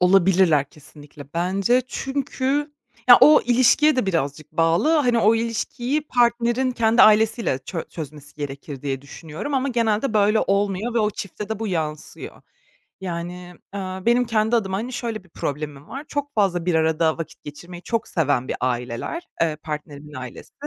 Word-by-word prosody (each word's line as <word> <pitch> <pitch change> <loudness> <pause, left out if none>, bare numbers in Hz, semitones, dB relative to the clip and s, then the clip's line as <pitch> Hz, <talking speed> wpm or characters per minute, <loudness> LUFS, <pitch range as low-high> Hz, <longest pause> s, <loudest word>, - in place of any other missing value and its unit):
olabilirler 180 -5 +4
kesinlikle 145 -1 -13
bence 195 +8 +1
çünkü 275 +2 -2 0.4
ya, 245 - +10
o 300 +4 +8
ilişkiye 255 +5 +4
de 255 - +1
birazcık 155 -4 -2
bağlı. 165 - +2
Hani, 245 -6 +2
o 220 0 +4
ilişkiyi 240 +5 -2
partnerin 240 +1 +2
kendi 230 -1 +3
ailesiyle 215 - +4
çö 160 +5 -5
çözmesi 150 -2 -9
gerekir 140 -1 -7
diye 135 -2 -3
düşünüyorum 160 - -7
ama 270 +1 +1
genelde 230 0 0
böyle 210 +1 +3
olmuyor 200 +3 0
ve - - +3
o 210 -1 +2
çifte 205 +1 -7
de 220 -2 -3
bu 225 - -3
yansıyor. 155 -4 -5 0.6
Yani, 180 0 -6 0.2
ııı, 190 -1 -5
benim 240 +1 +4
kendi 220 0 +1
adıma, 190 -4 -1
hani, 235 +5 -4
şöyle 230 -5 -4
bir - - -21
problemim 145 -2 -5
var: 275 +3 -7
Çok 285 0 -4
fazla 180 -5 +1
bir 180 - +1
arada 160 0 +2
vakit 165 -2 -8
geçirmeyi 175 +4 -10
çok 230 +2 -2
seven 145 -6 0
bir - - -2
aileler, 125 - -3
eee, 160 -2 0
partnerimin 150 -1 -8
ailesi 130 -2 -9
195 Hz, 155 wpm, -22 LUFS, 155-235 Hz, 0.6 s, ya